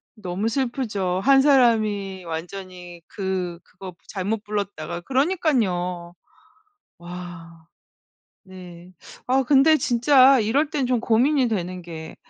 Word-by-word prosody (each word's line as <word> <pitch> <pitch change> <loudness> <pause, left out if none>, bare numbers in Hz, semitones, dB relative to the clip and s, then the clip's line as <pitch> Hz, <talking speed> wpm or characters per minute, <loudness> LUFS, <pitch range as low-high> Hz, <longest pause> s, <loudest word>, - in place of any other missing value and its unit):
너무 205 +1 -3
슬프죠. 225 -8 -2
1 270 0 +5
사람이 215 -9 +2
완전히 175 +1 -8
그 185 -3 -4
그거 185 0 -11
부 - - -29
잘못 205 +2 -3
불렀다가 200 -6 -4
그러니깐요. 215 - -1 0.8
와. 175 -2 -10 0.8
네. 180 -1 -13 0.3
아 265 +2 +2
근데 285 +4 +4
진짜 260 0 +4
이럴 280 +8 0
땐 275 -4 -1
좀 250 -2 0
고민이 250 +4 +2
되는 185 -4 -4
게 160 -2 -9
200 Hz, 210 characters per minute, -23 LUFS, 180-255 Hz, 0.8 s, 1